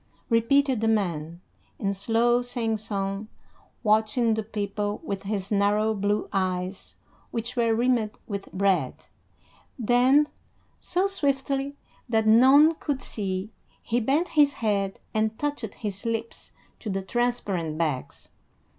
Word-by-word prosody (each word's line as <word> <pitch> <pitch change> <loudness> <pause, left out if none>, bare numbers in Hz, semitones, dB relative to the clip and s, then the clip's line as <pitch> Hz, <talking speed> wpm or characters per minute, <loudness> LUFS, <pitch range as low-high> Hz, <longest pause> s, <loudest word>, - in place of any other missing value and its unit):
repeated 255 +2 +3
the 225 - +1
man, 170 -6 -1 0.4
in 200 -1 -1
slow 230 +4 +2
singsong, 215 -4 -3 0.6
watching 220 +2 +3
the 220 - -1
people 205 -1 -3
with 200 -10 -4
his 200 -1 -3
narrow 210 +2 +2
blue 205 0 0
eyes 185 0 -2 0.3
which 230 0 -4
were 230 -2 +2
rimmed 235 -2 +2 0.2
with 200 -2 -5
red; 195 0 0 0.7
then, 250 +5 +4 0.5
so 365 +2 0
swiftly 280 -5 -1 0.3
that 220 -2 +2
none 265 +8 +7
could 285 -4 -3
see, 195 0 -3 0.3
he 240 +1 0
bent 285 +10 +1
his 290 -3 +4
head 200 -5 -1
and 220 0 0
touched 290 -8 -3
his 200 -3 -5
lips 230 0 -4 0.3
to 220 - -6
the 195 -1 -2
transparent 195 -9 -1
bags. 150 -6 -3
220 Hz, 120 wpm, -26 LUFS, 200-245 Hz, 0.7 s, none